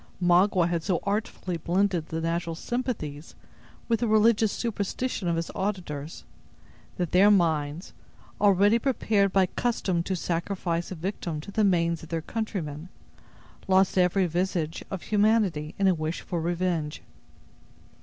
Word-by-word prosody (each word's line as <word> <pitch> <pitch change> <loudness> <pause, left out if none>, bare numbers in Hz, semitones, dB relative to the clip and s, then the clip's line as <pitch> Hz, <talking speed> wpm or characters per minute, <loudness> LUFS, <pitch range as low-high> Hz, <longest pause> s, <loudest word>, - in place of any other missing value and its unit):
Magua 180 0 +4
had 170 -1 -1
so 180 0 0
artfully 200 -3 -2
blended 175 0 0
the 160 - -3
natural 165 0 -2
sympathies 170 - -4 0.5
with 230 -2 +1
the 240 - 0
religious 220 0 +4
superstition 225 -1 -3
of 170 - +1
his 165 0 -3
auditors, 170 -7 -4 0.7
that 175 -4 -2
their 195 +3 +6
minds, 160 -4 +1 0.5
already 205 +2 +5
prepared 215 -6 +1
by 190 -1 +4
custom 185 -4 -1
to 185 +2 -2
sacrifice 170 0 -2
a 185 - -5
victim 170 -2 -4
to 160 - -9
the 215 +2 +1
manes 170 -4 +2
of 160 - -11
their 165 -2 -2
countrymen, 175 -8 -4 0.8
lost 190 0 +3
every 185 +1 +3
vestige 175 -2 -2
of 190 -3 -5
humanity 205 -8 +1
in 195 - +2
a 190 - +5
wish 155 0 -3
for 175 -3 -3
revenge. 170 -3 -2
180 Hz, 140 wpm, -27 LUFS, 165-205 Hz, 0.8 s, their